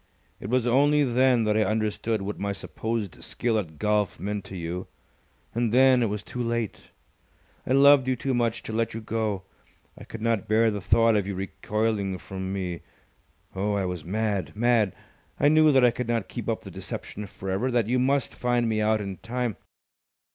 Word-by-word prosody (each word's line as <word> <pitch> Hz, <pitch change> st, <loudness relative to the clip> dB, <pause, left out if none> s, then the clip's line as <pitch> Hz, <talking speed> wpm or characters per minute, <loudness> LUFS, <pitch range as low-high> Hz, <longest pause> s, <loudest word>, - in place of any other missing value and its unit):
It 100 Hz, -, -6 dB
was 125 Hz, 0 st, +2 dB
only 145 Hz, +4 st, +4 dB
then 125 Hz, -2 st, +3 dB
that 105 Hz, -1 st, +1 dB
I 110 Hz, -, +4 dB
understood 110 Hz, 0 st, -1 dB
what 100 Hz, +1 st, -5 dB
my 100 Hz, 0 st, -1 dB
supposed 110 Hz, -1 st, -4 dB
skill 115 Hz, -2 st, 0 dB
at 80 Hz, -6 st, -7 dB
golf 105 Hz, 0 st, 0 dB
meant 105 Hz, 0 st, -3 dB
to 95 Hz, -, -8 dB
you, 85 Hz, +2 st, -4 dB, 0.7 s
and 115 Hz, -1 st, 0 dB
then 130 Hz, +1 st, +5 dB
it 115 Hz, -, +1 dB
was 105 Hz, 0 st, -4 dB
too 125 Hz, -, -5 dB
late. 115 Hz, -2 st, -3 dB, 0.8 s
I 130 Hz, -, +2 dB
loved 140 Hz, -1 st, +6 dB
you 130 Hz, -, +2 dB
too 130 Hz, +2 st, -2 dB
much 120 Hz, -1 st, 0 dB
to 110 Hz, -, -6 dB
let 115 Hz, 0 st, -1 dB
you -, -, -3 dB
go! 110 Hz, -3 st, -2 dB, 0.5 s
I -, -, -11 dB
could 110 Hz, -1 st, -8 dB
not 115 Hz, -4 st, 0 dB
bear 110 Hz, +1 st, +3 dB
the 105 Hz, -1 st, -4 dB
thought 115 Hz, +3 st, +4 dB
of 100 Hz, -2 st, +1 dB
you 100 Hz, -, -3 dB
recoiling 100 Hz, +1 st, -2 dB
from 95 Hz, 0 st, -6 dB
me. 90 Hz, -3 st, -3 dB, 0.7 s
Oh, 100 Hz, +2 st, 0 dB
I 100 Hz, -2 st, 0 dB
was 90 Hz, -3 st, -4 dB
mad 95 Hz, -3 st, -2 dB
mad! 115 Hz, -4 st, +2 dB, 0.4 s
I 145 Hz, -, +5 dB
knew 155 Hz, 0 st, +6 dB
that 130 Hz, -3 st, +5 dB
I 120 Hz, -, +5 dB
could 125 Hz, 0 st, -4 dB
not 115 Hz, -3 st, -1 dB
keep -, -, -5 dB
up -, -, -1 dB
the -, -, -10 dB
deception 105 Hz, 0 st, -7 dB
for 95 Hz, 0 st, -6 dB
ever, 105 Hz, +8 st, 0 dB
that 120 Hz, -3 st, +2 dB
you 125 Hz, +2 st, +1 dB
must 135 Hz, +1 st, +1 dB
find 120 Hz, -1 st, 0 dB
me 110 Hz, -1 st, 0 dB
out 110 Hz, 0 st, +2 dB
in 100 Hz, -2 st, -5 dB
time. 120 Hz, -2 st, -3 dB
110 Hz, 200 wpm, -26 LUFS, 100-120 Hz, 0.8 s, loved